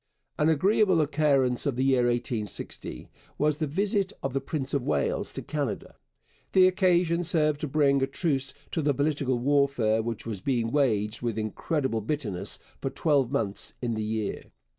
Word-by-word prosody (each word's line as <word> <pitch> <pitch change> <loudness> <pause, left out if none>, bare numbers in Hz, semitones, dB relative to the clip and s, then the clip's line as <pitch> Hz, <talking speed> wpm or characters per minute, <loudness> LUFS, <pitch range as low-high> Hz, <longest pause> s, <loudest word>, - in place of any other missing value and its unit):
An 150 - +4
agreeable 185 +3 +3
occurrence 140 -4 +2
of 140 - 0
the 130 - 0
year 130 -2 +3
1860 120 -3 -4 0.3
was 150 0 +1
the 155 - 0
visit 195 +5 0
of 135 - -2
the 135 - 0
Prince 135 -1 -3
of 140 - +1
Wales 470 - 0
to - - -6
Canada. - - -3 0.6
The 185 -1 +7
occasion 180 -2 +2
served 155 -4 +2
to 155 - -2
bring 140 -1 +2
a 135 - +2
truce 140 -2 -1 0.2
to 160 - -1
the 145 -2 +1
political 140 -2 0
warfare 130 -4 +2
which 115 -1 -5
was 105 -5 -5
being 120 -3 0
waged 110 -6 +1
with 115 -3 -2
incredible 115 +2 -1
bitterness 105 -7 -2 0.2
for 135 - -2
twelve 140 -2 +1
months 105 -8 -1
in 120 -2 -2
the 110 - -2
year. 110 -1 -3
140 Hz, 165 wpm, -27 LUFS, 120-155 Hz, 0.6 s, The